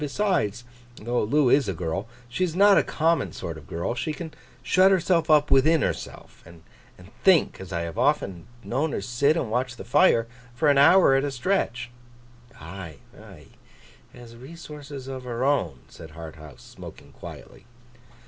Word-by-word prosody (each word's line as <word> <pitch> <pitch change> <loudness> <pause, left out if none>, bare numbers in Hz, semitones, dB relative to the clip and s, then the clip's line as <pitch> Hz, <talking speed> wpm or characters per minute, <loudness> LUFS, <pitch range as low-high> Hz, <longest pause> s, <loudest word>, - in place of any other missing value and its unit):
Besides, 145 - -1 0.3
though 120 +2 -2
Loo 135 +4 +2
is 135 -7 +3
a 95 - -3
girl, 90 +5 -4 0.2
she's 160 +8 -2
not 200 +1 +6
a - - +5
common 160 - 0
sort 85 - -6
of 75 -2 -13
girl. 85 +8 -3
She 120 +6 -3
can 160 0 -8 0.3
shut 185 +1 +4
herself 175 -3 +1
up 150 -1 +4
within 155 +3 +4
herself, - - -6
and 85 -1 -16 0.6
think—as 165 - +2
I 85 - -2
have 85 -1 -5
often 90 -4 0 0.2
known 145 +5 -2
her - - -2
sit 140 +6 +1
and 120 -9 -3
watch 125 +1 -1
the - - -9
fire—for 125 -1 +1
an 140 -1 +4
hour 170 +1 +6
at 135 0 +2
a 145 - -1
stretch.' 125 -4 -2 0.7
'Ay, 85 0 -9 0.2
ay? - - -14 0.7
Has 120 -1 -14
resources 145 0 -10
of 130 -1 -6
her 120 0 -3
own,' 90 - 0
said 80 -2 -13
Harthouse, 80 -4 -11
smoking - - -13
quietly. - - -12
125 Hz, 160 wpm, -25 LUFS, 100-155 Hz, 0.7 s, not